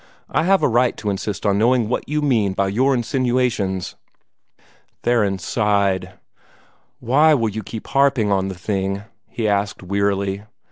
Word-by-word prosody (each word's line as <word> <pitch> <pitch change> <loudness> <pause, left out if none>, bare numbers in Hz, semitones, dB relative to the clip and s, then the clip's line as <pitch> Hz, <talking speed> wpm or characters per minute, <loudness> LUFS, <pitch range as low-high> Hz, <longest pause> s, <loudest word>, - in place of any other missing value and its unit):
I 160 - +1
have 195 +1 +3
a - - +5
right 120 +1 +2
to 105 - -2
insist 100 +1 -4
on 100 -1 +2
knowing 120 0 +3
what 125 - -3
you 150 0 -1
mean 110 -9 +2
by 95 0 0
your 130 +7 +2
insinuations." 120 -6 -1 1.1
Theron 105 -5 +2
sighed. 100 -1 0 0.9
"Why 150 +6 +4
will 115 -5 0
you 110 +1 -5
keep 110 +2 -8
harping 135 -6 +2
on 95 -1 +1
the 95 - -5
thing?" 95 +2 -2 0.3
he 115 -2 -2
asked 100 -1 -1
wearily. 100 0 -1
105 Hz, 150 wpm, -20 LUFS, 100-125 Hz, 1.1 s, a